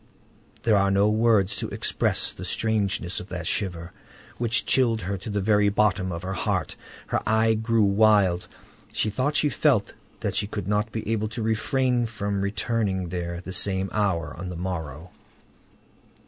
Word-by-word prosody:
There 110 -3 +4
are 100 0 +3
no 100 +1 +3
words 110 -3 +3
to - - -4
express - - 0
the - - -9
strangeness 105 -4 -1
of 90 - -9
that 90 -2 -5
shiver 85 -2 -3 0.5
which 115 -1 +1
chilled 115 -4 +2
her 95 +3 -2
to 105 - -7
the 100 -1 -1
very 105 0 +3
bottom 100 -2 +1
of 85 0 -5
her 95 +1 -3
heart; 95 - -1 0.3
her - - 0
eye 110 +1 +3
grew 110 0 +1
wild; 100 -3 +3 0.4
she 105 - -1
thought 130 +7 -1
she 150 - +3
felt 135 -8 +2 0.3
that - - -2
she 100 +1 0
should 100 -3 -4
not 105 +2 0
be 110 -2 -5
able 110 -1 0
to 115 +1 -5
refrain 120 +2 +1
from 100 -3 -3
returning 100 -3 -1
there 85 -1 -3
at 85 - -9
the 95 - -5
same 95 -1 +1
hour 95 -6 0
on 90 +2 -6
the 90 - -6
morrow. 85 -2 -5
100 Hz, 175 wpm, -25 LUFS, 95-110 Hz, 0.5 s, There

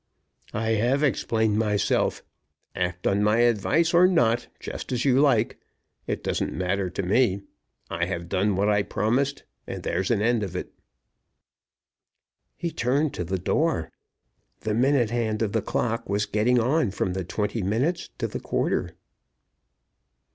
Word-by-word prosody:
"I 110 +1 0
have 120 +6 +2
explained 110 -6 +1
myself. 105 -2 +1 0.5
Act 90 -1 -2
on 100 +1 +2
my 105 +3 +3
advice 120 - +2
or 175 +2 +7
not, 120 -10 +2
just - - -7
as 125 0 -1
you 130 -1 +4
like. 120 -6 +2 0.5
It - - -3
doesn't - - -1
matter 95 +1 -1
to 95 +3 -4
me. 100 0 +2 0.4
I - - -1
have 85 0 -4
done 95 +2 +1
what 100 +2 +1
I 105 -1 +3
promised, 135 +8 0 0.2
and - - -6
there's 90 +2 -1
an 115 - +2
end 115 +1 +2
of 95 -3 -4
it." 90 - -5 1.8
He 170 - -3
turned 140 +4 0
to 90 - -3
the 95 +3 -2
door. 95 - 0 0.7
The 110 - -1
minute 125 -1 +2
hand 115 -2 0
of 105 - -1
the 110 - 0
clock 115 +3 -2
was 100 +1 +1
getting 120 +4 +2
on 130 +2 +2
from 95 -1 -2
the 95 0 -2
twenty 105 +5 -2
minutes 130 - -1
to - - -2
the - - -5
quarter. - - -1
110 Hz, 155 wpm, -25 LUFS, 100-125 Hz, 1.8 s, or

